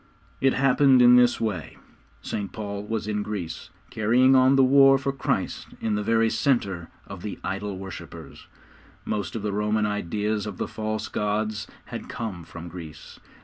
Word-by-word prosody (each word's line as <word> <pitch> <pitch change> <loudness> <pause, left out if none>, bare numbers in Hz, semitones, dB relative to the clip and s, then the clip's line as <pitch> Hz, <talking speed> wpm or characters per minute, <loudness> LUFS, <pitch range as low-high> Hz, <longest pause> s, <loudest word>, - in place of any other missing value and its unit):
It 135 0 +4
happened 135 0 +4
in 125 0 +8
this 125 0 +4
way: 100 -9 -3 0.5
St. 100 -2 -4
Paul 100 -2 -5
was 110 -2 -3
in 105 -1 -1
Greece, 100 -6 -5 0.2
carrying 125 +5 +4
on 130 +1 +5
the 135 - +5
war 135 +1 +6
for 135 +1 -2
Christ 135 - -2
in 110 - -1
the 105 - 0
very 115 +1 +2
centre 110 -7 0 0.2
of 100 -3 -9
the 105 - -5
idol 100 +1 -3
worshippers. 95 0 -10 0.6
Most 105 -1 -3
of 110 - -4
the 105 -1 -2
Roman 105 +1 +1
ideas 105 +1 -2
of 100 -3 -6
the - - -2
false 110 -1 -3
gods 105 0 -2 0.2
had - - -8
come 100 -7 -5
from 85 +1 -9
Greece. 80 -3 -10
105 Hz, 165 wpm, -25 LUFS, 100-120 Hz, 0.6 s, in